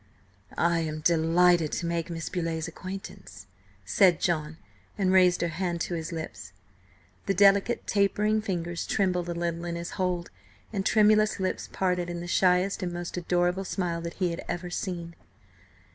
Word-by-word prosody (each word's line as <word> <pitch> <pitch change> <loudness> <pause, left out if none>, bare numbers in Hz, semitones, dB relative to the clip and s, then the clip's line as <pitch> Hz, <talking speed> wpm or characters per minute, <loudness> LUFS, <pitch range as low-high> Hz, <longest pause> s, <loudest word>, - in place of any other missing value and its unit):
"I 170 0 +2
am 155 -1 -3
delighted 170 0 +3
to - - -2
make 170 0 -2
Miss 165 -1 -4
Beauleigh's 165 -3 -2
acquaintance," 185 +4 -9 0.4
said 180 -5 +4
John, 160 -2 -1 0.4
and 190 -2 +2
raised 180 -1 +5
her 170 - 0
hand 170 +1 -2
to 175 - -2
his 165 0 -4
lips. 160 - -7 0.7
The 195 - +1
delicate, 200 +4 +4
tapering 210 +1 +2
fingers 175 -4 -3
trembled 180 -3 0
a 170 - -2
little 170 0 -2
in 170 -1 -3
his 170 0 -5
hold, 180 -2 -2 0.4
and 195 -2 -1
tremulous 215 0 +4
lips 190 -1 -2
parted 180 -2 0
in 175 0 -4
the 175 - -6
shyest 180 +2 +2
and 180 -1 -2
most 175 0 -5
adorable 180 +1 0
smile 175 -3 -2
that 170 0 -6
he 180 -3 0
had 170 - -5
ever 175 0 -4
seen. 170 -2 -4
175 Hz, 160 wpm, -27 LUFS, 170-190 Hz, 0.7 s, raised